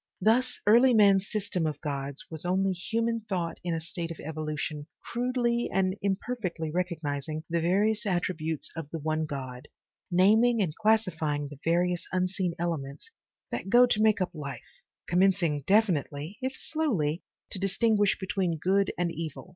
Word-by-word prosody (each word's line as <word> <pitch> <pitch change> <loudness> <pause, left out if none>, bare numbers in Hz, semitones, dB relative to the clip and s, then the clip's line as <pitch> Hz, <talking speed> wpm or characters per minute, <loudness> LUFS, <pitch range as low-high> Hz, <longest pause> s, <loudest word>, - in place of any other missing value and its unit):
Thus 250 +4 +2
early 240 +4 +6
man's 200 -2 +5
system 195 -6 -1
of 150 -2 -4
gods 140 -2 -4
was 160 -1 -5
only 190 +2 +1
human 230 +5 -1
thought 185 -6 -3
in 175 -2 -1
a - - -1
state 165 +1 -5
of 165 - -7
evolution 155 -1 -4 0.2
crudely 240 -1 0
and 190 0 +1
imperfectly 195 -5 -2
recognizing 155 -3 -3
the 170 -1 +1
various 210 +5 +1
attributes 160 -4 -2
of 165 -3 -6
the 165 - -4
one 155 0 -1
God, 130 -3 -6 0.4
naming 220 +6 +4
and 170 -7 0
classifying 165 -10 +1
the 145 -2 -11
various 175 +1 +1
unseen 185 -1 -1
elements 165 - -4 0.4
that - - -4
go 245 +4 +7
to 215 -3 +1
make 215 -2 +4
up 185 - 0
life, 140 -6 -8 0.3
commencing 175 -4 +2
definitely, 175 - +1
if 260 +1 -2
slowly, 190 - -1 0.3
to 190 - -2
distinguish 205 +1 +2
between 185 -3 -1
good 195 +4 +2
and 175 -1 0
evil. 165 +2 -6
180 Hz, 150 wpm, -28 LUFS, 155-210 Hz, 0.4 s, go